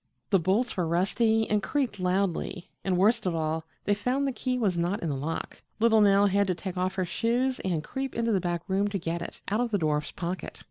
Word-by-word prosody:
The 195 - +5
bolts 200 +9 +1
were 180 -4 0
rusty 220 +6 +2
and 210 -1 +1
creaked 265 -7 -1
loudly, 180 -1 -1
and, 185 -2 +1
worst 215 +2 +3
of 175 - 0
all, 160 0 -1 0.2
they 205 - +2
found 250 +7 0
the 275 - +1
key 255 0 -2
was 205 -7 +1
not 175 +4 -1
in 165 - -1
the 140 - -1
lock. 150 +5 -4 0.2
Little 225 -1 +5
Nell 200 0 +5
had 200 0 +2
to 185 - +1
take 190 +1 -6
off 185 +1 -1
her 185 -1 0
shoes 240 +8 0
and 170 -5 -1
creep 270 +5 -4
into 230 0 +1
the 195 -4 +2
back 175 -1 -2
room 195 +1 +1
to 200 -1 -2
get 170 -1 -3
it - - -7
out 210 +3 +1
of 245 -1 +1
the 210 - +1
dwarf's 150 -4 0
pocket. 180 +1 -5
195 Hz, 235 wpm, -28 LUFS, 175-225 Hz, 0.2 s, The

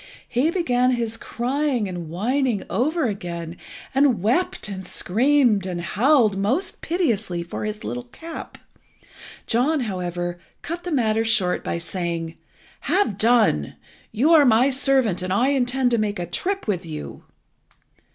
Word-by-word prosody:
He 260 +7 +1
began 255 -9 +1
his 230 -2 -1
crying 250 0 -1
and 175 -3 -6
whining 235 - 0
over 300 - +1
again, 170 -5 -4 0.4
and 270 -3 +3
wept 245 - +1
and 190 -2 -6
screamed 235 -1 +2
and 180 -2 -3
howled 220 - +3
most 265 - 0
piteously 220 - -1
for 170 +4 -5
his 215 0 -5
little 245 0 -4
cap. 325 +6 -9 0.9
John, 275 +6 +1
however, 175 -4 -3 0.2
cut 340 +2 -5
the 355 - -3
matter 225 -6 +2
short 205 -6 +1
by - - -2
saying 170 -1 -4 0.4
"Have 355 - 0
done. 220 - +3 0.4
You 255 +9 +2
are 320 -3 +7
my 250 +2 +4
servant, 265 -8 +2
and 185 0 -3
I 240 +8 +3
intend 260 -2 +1
to 235 - +2
make 210 -1 -1
a 175 - -3
trip 385 - -2
with 195 -5 -1
you." 155 -3 -8
225 Hz, 140 wpm, -23 LUFS, 185-270 Hz, 0.9 s, are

